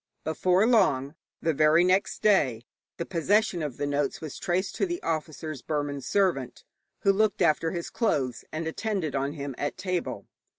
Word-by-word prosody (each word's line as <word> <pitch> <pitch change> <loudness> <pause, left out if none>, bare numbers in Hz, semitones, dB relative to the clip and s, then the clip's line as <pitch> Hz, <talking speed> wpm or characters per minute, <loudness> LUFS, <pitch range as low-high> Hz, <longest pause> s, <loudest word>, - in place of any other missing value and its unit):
Before 180 +5 +2
long 185 - +3 0.3
the 160 - +2
very 155 +3 +5
next 185 +2 +1
day 135 - +3 0.3
the 170 - -3
possession 190 +1 +1
of 145 -5 -4
the 145 - -1
notes 145 0 -1
was 155 -3 -7
traced 185 +2 -1
to - - +1
the 345 0 -3
officer's 155 -3 -3
Burman 145 -1 -2
servant, 170 -9 0 0.4
who 195 - +5
looked 215 0 +2
after 160 +1 +2
his 170 0 -5
clothes 140 - 0
and 160 +1 -3
attended 175 -2 -2
on 140 +1 -1
him 140 -3 -5
at 145 - -2
table. 175 - -3
160 Hz, 165 wpm, -27 LUFS, 145-190 Hz, 0.4 s, very